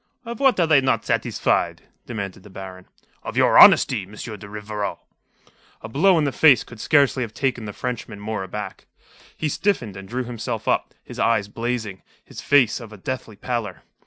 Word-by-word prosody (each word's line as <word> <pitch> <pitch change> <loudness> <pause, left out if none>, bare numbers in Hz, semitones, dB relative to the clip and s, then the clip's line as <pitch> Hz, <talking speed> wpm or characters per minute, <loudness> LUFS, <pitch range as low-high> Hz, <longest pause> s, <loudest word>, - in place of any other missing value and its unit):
"Of 235 -1 -6
what 265 -7 +3
are 170 - +4
they 155 -4 +5
not 130 0 0
satisfied?" - - 0 0.2
demanded 100 -5 -5
the 105 - -15
Baron. 95 -1 -10 0.3
"Of - - -7
your - - +5
honesty, - - +7
M. 95 +2 -12
de 105 -2 -8
Rivarol." 105 -1 -4 0.9
A - - -5
blow 170 +9 +4
in 155 - +2
the 140 - 0
face 145 -2 +5
could 115 - -13
scarcely 140 0 +3
have 110 -3 -5
taken 125 -3 -1
the 105 - -5
Frenchman 120 -2 -5
more 105 0 -4
aback. 105 +2 -7 0.5
He 155 - -1
stiffened, 150 - -1
and 95 0 -10
drew 125 +3 -2
himself 120 -2 -5
up, - - 0
his - - -10
eyes 110 -3 +2
blazing, 115 -3 -4 0.2
his - - -10
face 135 -5 +3
of 115 -3 -11
a 105 - -11
deathly 115 +1 -5
pallor. 115 -5 -4
115 Hz, 185 wpm, -22 LUFS, 105-130 Hz, 0.9 s, honesty